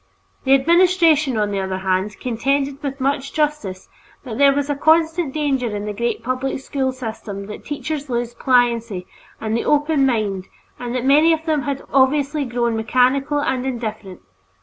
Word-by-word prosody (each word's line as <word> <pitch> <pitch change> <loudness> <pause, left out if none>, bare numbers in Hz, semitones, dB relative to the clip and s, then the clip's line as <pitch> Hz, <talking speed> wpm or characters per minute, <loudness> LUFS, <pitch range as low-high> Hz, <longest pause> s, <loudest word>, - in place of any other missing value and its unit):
The 265 +1 +6
administration, 330 -3 +3
on 210 -1 0
the 200 - -1
other 190 -1 -2
hand, 190 +2 -1
contended 275 +4 -1
with 280 -2 -4
much 275 +1 -1
justice 295 -12 -2 0.4
that 245 -2 -6
there 280 0 +6
was 280 0 -1
a 290 - 0
constant 320 +1 +2
danger 265 -7 -1
in 205 +1 -4
a 210 - -3
great 235 +2 -2
public 255 +2 -2
school 265 -1 -2
system 220 -5 -6
that 210 - -9
teachers 290 0 -4
lose 240 -1 -2
pliancy 235 -7 +1 0.3
and 220 0 -2
the 235 - 0
open 295 -1 +2
mind, 205 -6 -1 0.3
and 245 0 -4
that 250 0 -2
many 305 +5 +5
of 320 0 -3
them 310 -3 +1
had 280 -1 -3
obviously 280 +2 +2
grown 240 -2 -1
mechanical 255 +6 +1
and 260 -3 -1
indifferent. 220 -7 -5
260 Hz, 170 wpm, -20 LUFS, 225-285 Hz, 0.4 s, The